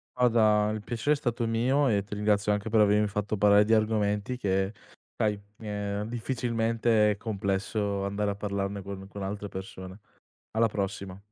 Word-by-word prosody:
Guarda, 110 -4 +4
il 110 - -5
piacere 120 +6 0
è - - +3
stato 120 -4 -1
mio, 130 +5 +2
e 100 -4 +2
ti 100 - -7
ringrazio 105 0 +1
anche 105 +1 -2
per 110 0 +3
avermi 105 0 +4
fatto 105 +1 -2
parlare 105 0 +6
di 110 - 0
argomenti 110 +1 +1
che 95 -4 0 0.5
sai, 105 -1 0 0.2
ehm, 105 -1 -3
difficilmente 115 -2 +1
è - - -5
complesso 100 -1 -2
andare 100 +1 -1
a - - -5
parlarne 100 -1 -3
con 95 0 -8
con 100 0 -7
altre 100 +1 -4
persone. 95 0 -8 0.5
Alla 115 +1 +2
prossima. 100 -2 -4
105 Hz, 165 wpm, -28 LUFS, 100-115 Hz, 0.5 s, parlare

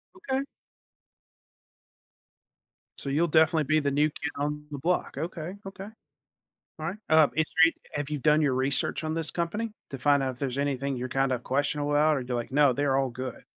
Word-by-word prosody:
Okay. 275 -7 -2 2.6
So, 140 - -5
you'll 155 +5 +2
definitely 160 0 +4
be 155 +2 +2
the 145 -2 0
new 150 +2 +3
kid 160 +1 -5
on 150 +1 -3
the 145 - -4
block. 175 +6 0
Okay, 170 +3 -4
okay. 195 0 -8 0.9
All 155 - -3
right, 175 +5 -3
um, 155 -2 +6
if 160 0 +2 0.2
re 165 - +4 0.2
have 145 0 -3
you 150 - -1
done 150 +2 +4
your 140 -4 +2
research 135 +4 0
on 155 0 -1
this 165 -1 -1
company 210 +7 -2 0.2
to 135 - -6
find 140 +1 +3
out 130 - -1
if 125 - -15
there's 135 -1 -2
anything 140 -1 -1
you're 125 +1 -4
kinda 135 -1 +1
questionable 145 +4 -1
about, 150 +1 +4
or 135 - -2
do 125 - -5
you - - 0
like, 120 - -4
"No, 140 0 +4
they're 135 +1 +1
all 135 -1 +1
good?" 130 0 -6
145 Hz, 195 wpm, -27 LUFS, 135-160 Hz, 2.6 s, um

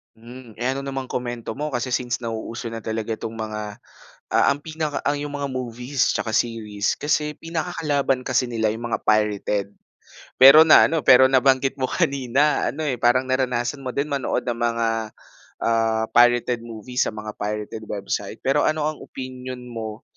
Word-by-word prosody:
Hmm. 120 +1 -12
Eh, 125 - +1
ano 135 +1 -3
namang 135 -1 -5
komento 120 -1 -4
mo 150 -1 -3
kasi 120 +1 -2
since 125 -1 -1
nauuso 115 +1 -5
na 115 -1 -8
talaga 110 0 -3
'tong 115 - -6
mga, 105 -2 -6 0.5
ah - - +3
ang 145 - -10
pinaka 155 -2 -3
ang 145 0 0
yung 145 0 -5
mga 140 -1 -3
movies 125 +1 -1
tsaka 110 - -2
series. 110 -2 -1
Kasi 150 0 -1
pinakakalaban 155 -5 -1
kasi 130 0 +1
nila 110 -3 -1
yung 115 +2 -4
mga - - -1
pirated. 105 -1 0 0.6
Pero 150 +5 +9
naano, 160 0 +5
pero 130 0 +7
nabanggit 135 +1 +3
mo 130 - 0
kanina 140 -2 +1
ano, 155 - -4
eh, 135 -6 -1
parang 130 +2 +2
naranasan 125 0 0
mo 130 -1 -5
din 145 +2 -1
manood 140 -2 -1
ng 120 -1 -3
mga, 115 -1 0 0.8
ah, 115 -1 +1
pirated 120 0 +3
movies 115 +2 -2
sa - - -3
mga 110 0 -6
pirated 105 +1 -4
website. 100 0 -4
Pero 140 +2 +2
ano 155 0 +1
ang 155 - -10
opinyon 130 -1 -7
mo 110 -1 -6
125 Hz, 165 wpm, -23 LUFS, 115-140 Hz, 0.8 s, Pero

